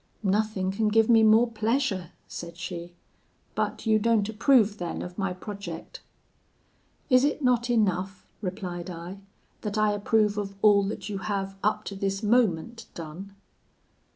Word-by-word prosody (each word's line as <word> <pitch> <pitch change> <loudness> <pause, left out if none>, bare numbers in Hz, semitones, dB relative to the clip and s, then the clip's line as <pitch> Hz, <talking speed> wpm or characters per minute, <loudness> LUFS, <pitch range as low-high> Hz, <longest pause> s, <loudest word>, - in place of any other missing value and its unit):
"'Nothing 200 -1 +1
can 215 +2 0
give 220 +1 +3
me 225 -1 +7
more 220 +2 +6
pleasure,' 220 - -1 0.2
said 170 -1 -8
she; 175 0 -6 0.6
'but - - -2
you 220 -1 +4
don't 220 -2 +2
approve 220 -2 +3
then 175 -1 -4
of 180 0 -8
my 195 -1 -1
project?' 185 -3 -7 1.1
"'Is 255 0 +6
it 290 +1 0
not 245 -1 +2
enough,' 195 -4 0 0.2
replied 180 -2 -5
I, 175 +3 -7 0.4
'that 210 -1 -3
I 215 0 +3
approve 210 0 +1
of 200 -1 -5
all 205 -2 +6
that 205 - -4
you 200 -2 -4
have, 195 -1 -3
up 210 +1 +1
to 200 - -6
this 195 +1 -2
moment, 230 0 +1
done?' 170 +5 -8
205 Hz, 150 wpm, -27 LUFS, 185-220 Hz, 1.1 s, me